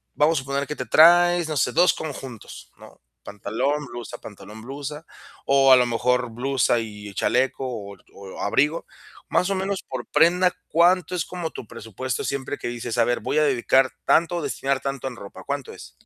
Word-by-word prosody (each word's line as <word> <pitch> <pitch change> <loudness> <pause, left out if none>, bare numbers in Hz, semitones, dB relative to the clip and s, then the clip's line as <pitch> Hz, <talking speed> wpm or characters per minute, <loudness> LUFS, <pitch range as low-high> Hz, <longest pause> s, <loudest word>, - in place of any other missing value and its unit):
vamos 155 +2 +3
a - - -6
suponer 140 +1 -2
que 150 - -4
te - - -5
traes, 175 +1 +5
no 155 - -3
sé, 125 - +1
2 175 +5 +4
conjuntos, 135 -7 -8
¿no? - - -16 0.2
Pantalón, 115 +9 -2
blusa, 120 0 -8
pantalón, 110 0 -12
blusa, 145 +4 -7 0.4
o 135 -1 +5
a - - +10
lo 125 - +3
mejor 125 +1 0
blusa 125 0 +1
y 105 -2 -8
chaleco, 130 +4 0
o 100 -5 -7 0.2
o 100 -1 -11
abrigo. 150 +10 +1 0.4
Más 180 - +1
o - - +1
menos 190 0 -3
por 130 -2 -7
prenda, 180 +4 +4 0.2
¿cuánto 180 +1 +3
es 175 - -1
como 175 -3 -5
tu 110 - -9
presupuesto? 115 +3 -5
Siempre 140 +1 -3
que - - -5
dices: 120 -1 -5
"A 120 - +5
ver, 120 +1 0
voy - - -2
a 155 - +4
dedicar 130 -1 +2
tanto 170 +1 +3
o 170 - -2
destinar 135 -2 -1
tanto 135 -1 -4
en 130 - -6
ropa", 100 -2 -11
¿cuánto - - -4
es? - - -12
135 Hz, 190 wpm, -23 LUFS, 120-160 Hz, 0.4 s, a